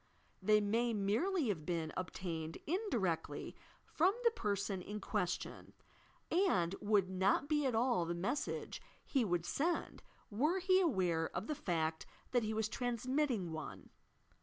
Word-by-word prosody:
They 210 +2 +5
may 230 +3 +1
merely 245 - +1
have 170 -7 -1
been 165 -1 -2
obtained 165 -3 -4
indirectly 240 - -1 0.3
from 370 +6 +2
the 470 - +5
person 200 - -1
in 205 +3 -5
question, 195 -3 -3 0.6
and 330 - +3
would 205 -2 +3
not 190 +8 +2
be 295 -2 +2
at 250 - 0
all 235 -6 +2
the 170 +1 -2
message 200 +12 -2 0.2
he 270 -4 +2
would 175 -5 0
send, 330 - -1 0.3
were 300 - +2
he 375 0 +4
aware 180 - +1
of 185 - -3
the 305 - -1
fact 165 - -1 0.2
that 245 - +3
he 215 -1 -1
was 220 0 0
transmitting 245 - -1
one. 125 - -7
210 Hz, 140 wpm, -36 LUFS, 175-275 Hz, 0.6 s, They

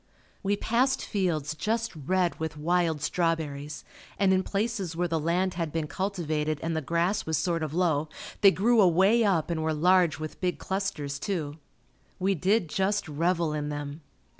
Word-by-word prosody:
We 200 +1 0
passed 250 +6 +1
fields 165 -7 -1
just 225 +5 -2
red 175 +4 0
with 160 -1 -4
wild 165 -1 +1
strawberries 150 -4 -2 0.3
and 195 -2 +3
in 185 - +3
places 200 -4 -2
where 175 +1 0
the 165 -1 -1
land 180 +4 0
had 165 -3 -3
been 160 0 -1
cultivated 155 -4 -2
and 165 0 -1
the 160 - 0
grass 170 +7 0
was 160 -1 +1
sort 170 -2 0
of 155 0 -3
low, 160 -4 +1 0.3
they 200 - +9
grew 220 +4 +3
away 190 +6 +4
up 175 -6 +1
and 160 -2 -1
were 160 0 0
large 175 0 +4
with 155 0 -7
big 180 -1 0
clusters, 150 -8 -3
too. 155 -5 -3 0.6
We 190 +2 +1
did 190 +3 +1
just 195 +5 0
revel 165 +1 0
in 150 -1 -2
them. 145 +1 -5
170 Hz, 170 wpm, -27 LUFS, 155-190 Hz, 0.6 s, they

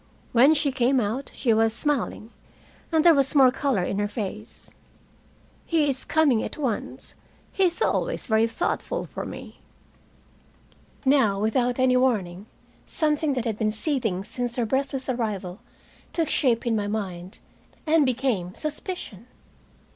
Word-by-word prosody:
When 265 +6 +6
she 290 -1 +1
came 255 +1 +2
out, 235 +5 -2
she 235 -4 +1
was 225 0 +2
smiling, 255 -5 -2 0.6
and 320 0 +2
there 340 - +8
was 275 -1 +1
more 265 -3 +7
color 255 -8 0
in 195 +2 -2
her 205 - 0
face. 210 0 -7 0.9
"He 320 -3 +1
is 270 -2 0
coming 285 -8 +3
at - - -5
once. 255 -8 -4 0.4
He 385 - +2
is 355 +5 0
always - - -1
very 220 -1 +3
thoughtful - - -2
for - - -7
me." - - -10 1.5
Now, 265 -8 +3
without 240 +3 +1
any 255 -1 +3
warning, 205 -7 0 0.4
something 300 -2 +1
that 250 -2 -2
had 220 -3 -2
been 215 -1 +1
seething 220 - -1
since 245 +3 -3
her 240 - 0
breathless 270 +2 -2
arrival 215 -7 -3 0.5
took 330 -2 0
shape 245 -5 +2
in 235 -2 +1
my 205 -1 -1
mind, 190 -4 -4 0.5
and 315 -1 +4
became 245 -9 -1
suspicion. 305 - -5
250 Hz, 145 wpm, -25 LUFS, 215-280 Hz, 1.5 s, there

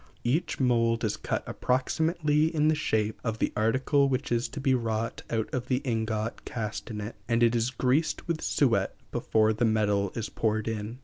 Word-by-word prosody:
Each 150 +8 0
mould 115 -3 +2
is 105 -2 0
cut - - -3
approximately 150 +4 +1
in 155 -2 +2
the - - +4
shape 110 -8 -1
of 115 -2 -2
the - - -1
article 130 +5 +2
which 130 0 -2
is 120 +1 +1
to 140 - -6
be 135 -1 +2
wrought 115 -2 -1
out 110 -1 0
of 125 -1 -2
the 130 - +2
ingot 110 -2 -2
cast 110 0 -5
in 105 -2 -5
it, 105 +2 -6
and 115 0 +3
it 120 0 +4
is 115 +1 +1
greased 130 +7 0
with 170 -2 -1
suet 130 -5 +1 0.2
before 110 0 +2
the 110 - -1
metal 105 -3 +2
is 115 -2 -2
poured 110 -1 -1
in. 110 +1 -4
115 Hz, 190 wpm, -28 LUFS, 110-135 Hz, 0.2 s, the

